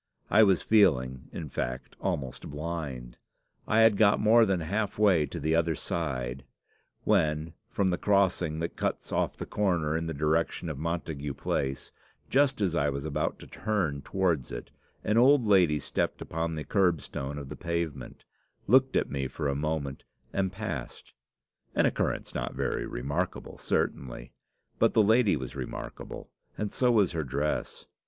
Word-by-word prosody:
I - - +7
was 95 -4 +4
feeling, 65 -12 +3
in 80 - -6
fact, 65 -2 -4
almost 75 -10 -3
blind. 75 -6 -5 0.5
I 110 +1 +4
had 110 -2 +6
got 105 -1 +5
more 110 +1 +5
than 95 -3 +1
half 100 +6 -2
way 95 -8 +4
to - - -6
the 80 - 0
other 80 0 +2
side, 65 -6 -3 0.6
when, 75 +1 +1 0.2
from 95 -2 +1
the 90 - -1
crossing 90 -5 +2
that 85 - -3
cuts - - -2
off - - 0
the - - -5
corner 85 -7 0
in 80 0 -1
the 80 - -3
direction 80 +3 0
of 75 -3 -5
Montagu 80 -3 -3
Place, 65 0 -2 0.4
just 135 -3 +3
as 95 -4 +1
I 75 -2 +2
was 70 +1 -4
about 80 - -1
to - - -9
turn 90 -10 -1
towards 85 -9 0
it, - - -7 0.3
an 105 +2 +3
old 130 0 +6
lady 90 -7 +4
stepped 75 - -2
upon 80 0 -3
the 75 - -4
kerbstone 80 -7 0
of 70 -2 -7
the - - -6
pavement, 85 -6 -4 0.4
looked 130 +1 +4
at - - 0
me 70 -1 -1
for 70 - -3
a 70 - +1
moment, 70 -2 -2 0.3
and 95 -1 0
passed 95 - -6 0.6
an - - +4
occurrence - - -1
not - - -3
very - - -1
remarkable, 70 +4 -3
certainly. - - -2 0.5
But - - +3
the 110 - +6
lady 110 -2 +4
was 65 -3 -6
remarkable, - - -7 0.3
and 105 -1 -2
so 125 -1 +3
was 105 -6 +4
her 80 -3 -2
dress. 70 +3 -2
80 Hz, 160 wpm, -29 LUFS, 70-100 Hz, 0.6 s, I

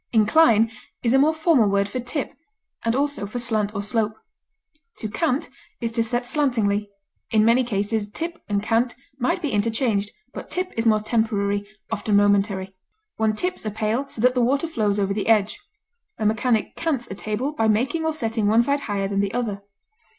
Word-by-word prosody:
Incline 225 0 +4 0.3
is 235 0 +2
a 270 - +5
more 295 +3 +5
formal 315 - +3
word 200 0 +2
for 230 +5 -4
tip, 250 +3 -4 0.5
and 230 +1 +1
also 285 -6 -1
for 215 - -6
slant 220 -3 0
or 200 - -2
slope. 215 0 0 0.8
To 215 - -4
cant 265 +5 0 0.3
is 230 -2 -2
to 230 0 0
set 240 +2 -2
slantingly; 225 -8 0 0.4
in 215 -1 +3
many 235 +3 +4
cases 205 -1 -1
tip 335 +8 -5
and 200 0 0
cant 235 +3 +1 0.2
might 250 +5 0
be 295 - -1
interchanged, 210 -1 0 0.2
but - - -8
tip 365 +1 -2
is 230 0 0
more 215 -1 +4
temporary, 205 -2 0 0.2
often 210 -1 0
momentary; 200 -1 +2 0.4
one 220 -1 +1
tips 360 +10 -2
a 215 - -2
pail 220 +5 -1
so 225 - -7
that 250 +1 +4
the 250 - +1
water 275 +6 +2
flows 210 -10 0
over 195 -1 +1
the 205 - -2
edge; 215 - +3 0.6
a 220 - -2
mechanic 220 +1 +1
cants 275 -8 -1
a - - -2
table 215 +7 -2
by 225 -6 +1
making 250 +10 +1
or 320 - +1
setting 225 -7 -1
one 225 +3 +5
side 280 +3 +1
higher 200 -1 0
than 200 0 -1
the 200 +2 -1
other. 215 -5 -2
225 Hz, 185 wpm, -23 LUFS, 205-250 Hz, 0.8 s, a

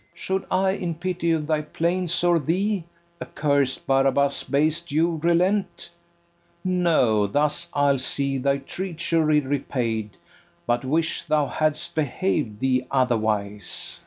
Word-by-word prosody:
FERNEZE. - - -18
Should 190 0 -2
I 190 +1 +2
in 175 -4 -3
pity 175 0 -1
of 160 -2 0
thy 155 0 0
plaints 170 +2 -1
or 175 -1 +4
thee, 185 +5 -1 0.4
Accursed 140 -3 0
Barabas, 135 +1 +2
base 155 +3 +1
Jew, 165 +1 0
relent? 180 +4 +1 0.7
No, 160 - +2
thus 150 - 0
I'll 140 -1 +3
see 135 +1 0
thy 140 +1 +1
treachery 160 0 0
repaid, 120 -6 -2 0.5
But 120 +1 0
wish 160 +5 0
thou 150 -1 +2
hadst 155 +2 -1
behav'd 145 - -1
thee 130 -1 +1
otherwise. 110 -6 -1
150 Hz, 125 wpm, -24 LUFS, 135-170 Hz, 0.7 s, or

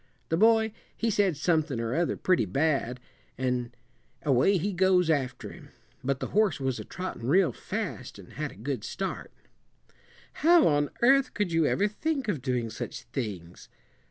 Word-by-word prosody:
The 165 - +2
boy, 220 +1 +4 0.2
he 230 0 0
said 195 -6 +2
somethin' 155 -5 +1
or 115 +1 -2
other 170 +3 0
pretty 185 -11 +2
bad 135 - 0 0.4
an' 125 -1 -1 0.5
away 145 +8 +3
he 195 +4 -2
goes 180 -2 +3
after 135 -5 -2
him; - - -13 0.3
but 135 0 -1
the - - -4
horse 210 -6 +2
was 130 -2 -2
a - - -5
trottin' 180 -10 -6
real 175 +1 +4
fast, - - -5
an' - - -13
had - - -4
a - - -14
good 120 +1 -4
start." 195 0 -4 1.1
"How 340 +1 +6
on 145 -1 +2
earth 270 +1 +4
could 205 -4 -1
you 165 -2 +3
ever 205 - +2
think 275 +4 -2
of 175 -11 -1
doing 125 -3 -1
such - - -6
things?" 100 -9 -6
160 Hz, 165 wpm, -28 LUFS, 125-200 Hz, 1.1 s, How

